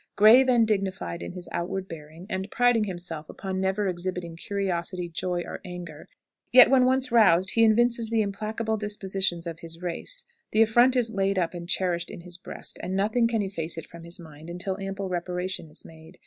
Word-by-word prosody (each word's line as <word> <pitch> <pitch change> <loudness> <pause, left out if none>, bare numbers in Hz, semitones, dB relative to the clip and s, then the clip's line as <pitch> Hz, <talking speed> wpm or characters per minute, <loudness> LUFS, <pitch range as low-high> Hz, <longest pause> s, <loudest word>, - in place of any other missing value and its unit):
Grave 235 +6 +7
and 235 -3 +4
dignified 190 - -2
in 85 - -6
his 180 -1 -7
outward 185 +2 -3
bearing, 160 +1 -10
and 190 -1 -3
priding 245 -2 +3
himself 175 -5 -5
upon 190 -1 -4
never 190 +2 0
exhibiting 180 -2 -3
curiosity, 180 -1 -2
joy, 175 +1 -2
or - - -7
anger, 175 -4 -8 0.4
yet 250 0 +9
when 260 -2 +6
once 260 0 +2
roused 190 -5 +5
he 230 - +4
evinces 230 +1 +3
the 225 -1 +2
implacable 220 +2 -2
dispositions 195 -4 -2
of 165 -1 -6
his 165 0 -9
race; 485 - -2 0.3
the 215 - +4
affront 240 +4 +4
is 240 -3 +2
laid 195 -1 0
up 175 -2 0
and 175 0 -7
cherished 175 -2 0
in - - -8
his 175 0 -5
breast, - - -5
and 185 - -3
nothing 215 +4 +2
can 225 -2 0
efface 165 -4 -2
it 165 - -6
from 170 -1 -12
his 170 +1 -7
mind 160 -1 -12
until 180 +2 -3
ample 195 0 -4
reparation 180 0 -3
is 150 - -10
made. 160 0 -14
190 Hz, 190 wpm, -26 LUFS, 170-220 Hz, 0.4 s, yet